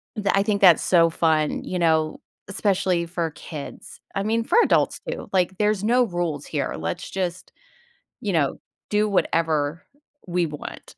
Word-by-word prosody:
tha 200 -2 +1
I 195 - +3
think 205 -1 0
that's 180 -4 +7
so 170 -2 +4
fun, 160 -2 +1
you 180 - -3
know, 160 -2 +1 0.3
especially 190 -3 0
for 170 -1 -3
kids. 150 -1 -9 0.2
I 195 - 0
mean, 225 +2 0
for 445 - +1
adults - - +2
too. - - -5
Like, 185 0 +1
there's 210 -1 +1
no 245 +3 +4
rules 175 -7 -3
here. 145 -4 -2
Let's 80 +1 -4
just, 180 -1 -4 0.7
you 205 - -2
know, 155 -5 +1 0.3
do 210 0 +2
whatever 165 -4 0 0.4
we 175 -1 0
want. 150 -1 -9
175 Hz, 160 wpm, -23 LUFS, 160-200 Hz, 0.7 s, that's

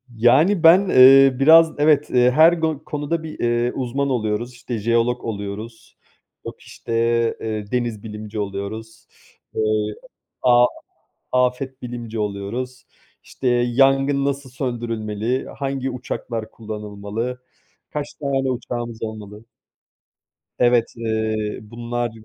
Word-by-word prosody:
Yani 155 - +4
ben, 180 +4 +6
eee, 135 +1 +8
biraz 160 +2 +7
evet, 150 0 +3
eee, 125 0 +4
her 160 +5 +6
go 160 -3 -2
konuda 150 +2 -3
bir, 155 - -8
eee, 120 +1 +1
uzman 135 +2 -2
oluyoruz. 120 0 -2
İşte, 120 0 -6
jeolog 115 +3 0
oluyoruz, 105 +1 -7 0.5
yok - - -8
işte, 115 - -8 0.5
eee, 110 -2 -4
deniz 120 -4 -2
bilimci 105 0 -7
oluyoruz, 105 +3 -6 0.5
eee, - - 0 0.8
a 120 -1 +5 0.7
afet 125 +1 0
bilimci 120 -2 -6
oluyoruz. 115 +5 -4 0.4
İşte, - - -5
yangın 135 +3 +2
nasıl 140 -1 -3
söndürülmeli, 120 -2 -3
hangi 135 -1 -2
uçaklar 120 -3 -5
kullanılmalı, 110 +3 -6 0.5
kaç 150 -1 -5
tane 135 -3 -1
uçağımız 120 -2 -5
olmalı? 110 -1 -8 1.1
Evet, 120 -1 +3
eee, 110 -2 -2
bunlar 120 0 -3
120 Hz, 110 wpm, -21 LUFS, 110-135 Hz, 1.1 s, eee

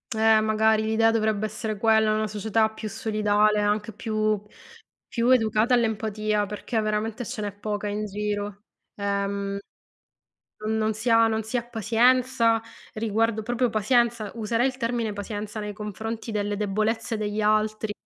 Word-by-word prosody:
Eh 220 0 +5
magari 220 0 +3
l'idea 225 +1 +3
dovrebbe 215 -1 +1
essere 215 0 -4
quella, 220 0 +3
una 215 0 0
società 220 +1 +1
più 220 0 -6
solidale, 210 -1 +2
anche 210 +1 0
più 215 -1 -1 0.7
più 235 +1 0
educata 225 -1 +4
all'empatia, 215 -2 0
perché 215 +2 -2
veramente 215 +3 -2
ce 215 - -5
n'è 205 - -2
poca 205 +1 -4
in 210 +1 -2
giro, 205 0 -4 0.3
ehm, 200 0 -2 1.1
non 220 +1 0
non 220 0 +1
si 220 +3 -4
ha 230 0 +6
non 220 0 -1
si 220 +3 -2
ha 235 - -1
pazienza, 235 +1 +3 0.3
riguardo 220 0 0
proprio 245 +2 0
pazienza, 230 0 +1
userei 230 +2 0
il 260 -1 -2
termine 230 -3 -2
pazienza 205 +1 -5
nei 210 0 -4
confronti 220 +2 -5
delle 205 -1 -1
debolezze 215 +3 -1
degli 210 0 -2
altri. 215 0 +1
215 Hz, 145 wpm, -25 LUFS, 210-225 Hz, 1.1 s, ha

